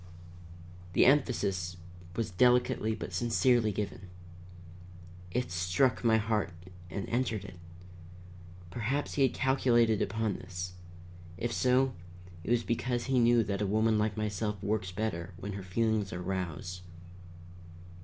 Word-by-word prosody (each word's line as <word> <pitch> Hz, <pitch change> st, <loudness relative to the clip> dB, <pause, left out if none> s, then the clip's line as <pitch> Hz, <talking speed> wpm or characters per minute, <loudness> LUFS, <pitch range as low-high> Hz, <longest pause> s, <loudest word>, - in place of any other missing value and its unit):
The -, -, +5 dB
emphasis 100 Hz, -11 st, +2 dB, 0.4 s
was 115 Hz, -5 st, -2 dB
delicately 125 Hz, +1 st, +3 dB
but 110 Hz, -, -7 dB
sincerely 120 Hz, -1 st, +3 dB
given. 100 Hz, -2 st, -4 dB, 1.2 s
It 125 Hz, +3 st, -2 dB
struck 90 Hz, +10 st, +1 dB
my 110 Hz, -1 st, +5 dB
heart 110 Hz, -2 st, 0 dB, 0.4 s
and 95 Hz, +4 st, -4 dB
entered 115 Hz, -5 st, -1 dB
it. 95 Hz, -3 st, -11 dB, 1.1 s
Perhaps 125 Hz, +8 st, -2 dB
he 145 Hz, -, 0 dB
had 135 Hz, -3 st, +3 dB
calculated 120 Hz, -5 st, +3 dB
upon 110 Hz, -3 st, -1 dB
this. 90 Hz, -1 st, -6 dB, 0.6 s
If 120 Hz, +3 st, -2 dB
so, 130 Hz, +1 st, +3 dB, 0.5 s
it -, -, -6 dB
was 120 Hz, -1 st, +3 dB
because 120 Hz, +1 st, -1 dB
he 135 Hz, -1 st, +2 dB
knew 120 Hz, 0 st, +5 dB
that 100 Hz, -1 st, -2 dB
a 105 Hz, -, +1 dB
woman 110 Hz, +2 st, +2 dB
like 105 Hz, 0 st, 0 dB
myself 105 Hz, 0 st, -2 dB
works 100 Hz, -3 st, -1 dB
better 90 Hz, -3 st, -3 dB
when 100 Hz, +2 st, -5 dB
her 100 Hz, -, -5 dB
feelings 105 Hz, +2 st, 0 dB
are 90 Hz, -, -4 dB
roused. 90 Hz, -1 st, -4 dB
110 Hz, 130 wpm, -31 LUFS, 95-120 Hz, 1.2 s, The